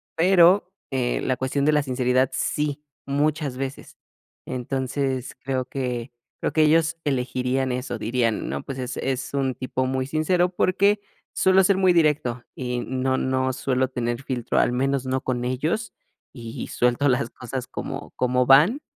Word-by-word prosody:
pero, 180 +2 +5 0.2
eh, 125 -2 0
la 130 - 0
cuestión 130 +2 -1
de 155 - +5
la 150 -1 +2
sinceridad 130 -1 +1
sí, 150 +2 -1 0.2
muchas 145 0 0
veces. 135 0 -6 0.5
Entonces, 130 +1 -2
creo 130 -1 -1
que 125 -2 -4 0.3
creo - - 0
que 155 - +4
ellos 160 +2 +3
elegirían 130 -1 0
eso, 125 -1 -3
dirían: 115 0 -1
"No, - - -3
pues 135 - -6
es 125 0 -4
es 130 0 -3
un 135 -2 0
tipo 130 0 -2
muy 130 0 -1
sincero", 175 +4 +2
porque 200 +3 +2 0.3
suelo 190 0 +4
ser 195 0 +3
muy 185 -2 +4
directo, 150 -7 +1
y 125 -1 -3
no 130 0 -1
no 130 0 0
suelo 130 0 0
tener 120 -1 -3
filtro, 125 -3 -1
al - - +2
menos 135 +1 0
no 130 0 -1
con 125 -1 -2
ellos, 155 - -2 0.4
y 115 -3 -6
suelto 125 +4 +1
las 125 -2 +1
cosas 125 +1 -6
como - - -6
como 125 0 +2
van. 160 - +6
130 Hz, 160 wpm, -24 LUFS, 125-150 Hz, 0.5 s, van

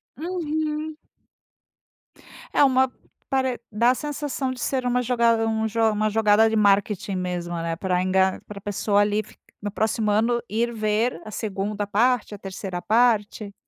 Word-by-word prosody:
Uhum. 310 -1 -3 1.6
É - - +5
uma 260 -1 +3 0.4
pare 260 -2 0
dá 235 +4 +3
a - - 0
sensação 290 -2 -3
de 255 - -7
ser 260 -2 -1
uma 250 0 +1
jogada 235 -2 +2
um 220 0 0
jo 225 +1 -2
uma 215 0 0
jogada 220 0 +4
de 220 - -1
marketing 200 -1 +2
mesmo, 180 -1 -3
né, 165 0 -2
pra 180 +1 0
enga 190 0 +2
para 200 -1 -9
pessoa 205 +1 +1
ali 205 +1 +1 0.4
no 205 0 -4
próximo 215 +1 0
ano 230 +3 +2
ir 235 +3 0
ver 215 -2 0
a 215 - -8
2ª 205 0 -3
parte, 225 +1 +1
a - - -10
3ª 190 -2 -6
parte. 215 -2 +1
220 Hz, 155 wpm, -24 LUFS, 205-250 Hz, 1.6 s, É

